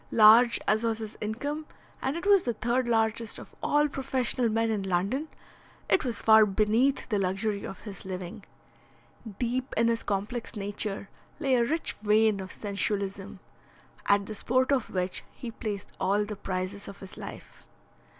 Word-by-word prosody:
Large 230 Hz, +2 st, +7 dB
as 215 Hz, +2 st, +2 dB
was 225 Hz, -1 st, 0 dB
his 220 Hz, -1 st, -7 dB
income, 285 Hz, +9 st, -3 dB, 0.3 s
and 270 Hz, +5 st, -1 dB
it 340 Hz, -, -6 dB
was 400 Hz, -2 st, +6 dB
the 240 Hz, -6 st, -2 dB
third 240 Hz, +3 st, 0 dB
largest 225 Hz, -1 st, +1 dB
of -, -, -12 dB
all 295 Hz, 0 st, +3 dB
professional 255 Hz, -3 st, 0 dB
men 225 Hz, +1 st, +1 dB
in 210 Hz, -2 st, -1 dB
London, 195 Hz, -, -1 dB, 0.6 s
it -, -, +3 dB
was 245 Hz, -4 st, -1 dB
far 220 Hz, 0 st, +8 dB
beneath 215 Hz, +7 st, +2 dB
the 210 Hz, -3 st, +1 dB
luxury 200 Hz, +2 st, -1 dB
of 195 Hz, -, -7 dB
his 200 Hz, -4 st, -8 dB
living. 185 Hz, -2 st, -6 dB, 0.9 s
Deep 255 Hz, +2 st, -2 dB
in 230 Hz, +1 st, +4 dB
his 230 Hz, 0 st, 0 dB
complex 205 Hz, +5 st, -3 dB
nature 200 Hz, 0 st, -1 dB, 0.3 s
lay 275 Hz, -4 st, +1 dB
a 240 Hz, -2 st, +4 dB
rich 315 Hz, +7 st, 0 dB
vein 215 Hz, -1 st, +3 dB
of 190 Hz, -1 st, -6 dB
sensualism, 200 Hz, -1 st, -2 dB, 0.7 s
at 200 Hz, 0 st, +3 dB
the 215 Hz, -, -6 dB
sport 255 Hz, +5 st, +1 dB
of 265 Hz, -4 st, +1 dB
which 180 Hz, -1 st, -1 dB
he 240 Hz, -, -7 dB
placed 210 Hz, -3 st, -5 dB
all 200 Hz, +2 st, +1 dB
the 210 Hz, 0 st, -6 dB
prizes 190 Hz, +1 st, -4 dB
of 200 Hz, -, -10 dB
his 190 Hz, -, -10 dB
life. -, -, -10 dB
220 Hz, 165 wpm, -28 LUFS, 200-245 Hz, 0.9 s, far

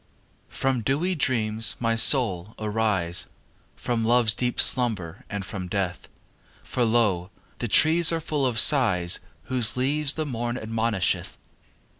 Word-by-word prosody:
XV -, -, -17 dB
From 130 Hz, -2 st, 0 dB
dewy 150 Hz, -, 0 dB
dreams, 115 Hz, -7 st, 0 dB
my 115 Hz, -1 st, 0 dB
soul, 110 Hz, -6 st, +2 dB
arise, 105 Hz, -5 st, -1 dB, 0.5 s
From 120 Hz, -2 st, -2 dB
love's 115 Hz, -1 st, +3 dB
deep 125 Hz, +4 st, -2 dB
slumber 105 Hz, -8 st, +1 dB
and 100 Hz, -2 st, -5 dB
from 95 Hz, -1 st, -6 dB
death, 90 Hz, -2 st, -4 dB, 0.5 s
For 125 Hz, -, -2 dB
lo! 110 Hz, -6 st, +1 dB, 0.3 s
the 120 Hz, -, -3 dB
treees 160 Hz, +8 st, +4 dB
are 165 Hz, -, -1 dB
full 150 Hz, -4 st, -1 dB
of 120 Hz, -3 st, -3 dB
sighs 100 Hz, -12 st, +3 dB, 0.2 s
Whose 125 Hz, -2 st, 0 dB
leaves 140 Hz, +3 st, +2 dB
the 155 Hz, -, -3 dB
morn 120 Hz, -2 st, -3 dB
admonisheth. 110 Hz, -3 st, -2 dB
115 Hz, 135 wpm, -24 LUFS, 105-130 Hz, 0.5 s, treees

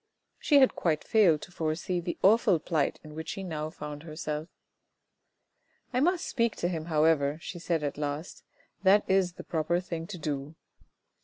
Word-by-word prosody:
She 290 Hz, -, +4 dB
had 265 Hz, -2 st, +6 dB
quite 155 Hz, -3 st, 0 dB
failed 185 Hz, -9 st, +4 dB
to -, -, -10 dB
foresee 165 Hz, +2 st, -2 dB
the 175 Hz, 0 st, -4 dB
awful 205 Hz, -2 st, +5 dB
plight 155 Hz, -2 st, -1 dB
in 155 Hz, -1 st, -11 dB
which 160 Hz, +1 st, -6 dB
she 195 Hz, -, -4 dB
now 155 Hz, -4 st, -4 dB
found 150 Hz, -2 st, -7 dB
herself. 155 Hz, 0 st, -5 dB, 0.8 s
" -, -, -43 dB
I 250 Hz, -, +2 dB
must 350 Hz, +5 st, +2 dB
speak 235 Hz, -3 st, 0 dB
to 175 Hz, -, -1 dB
him, 165 Hz, -3 st, -3 dB
however," 155 Hz, -3 st, +2 dB
she 175 Hz, +2 st, -7 dB
said 165 Hz, -2 st, -1 dB
at 145 Hz, 0 st, -3 dB
last. 150 Hz, +3 st, -4 dB, 0.2 s
" -, -, -40 dB
That 200 Hz, +2 st, +4 dB
is 190 Hz, -2 st, +2 dB
the -, -, -9 dB
proper 170 Hz, +1 st, 0 dB
thing 170 Hz, -2 st, -5 dB
to 185 Hz, -, -7 dB
do. 145 Hz, -1 st, -4 dB
165 Hz, 180 wpm, -29 LUFS, 155-190 Hz, 0.8 s, had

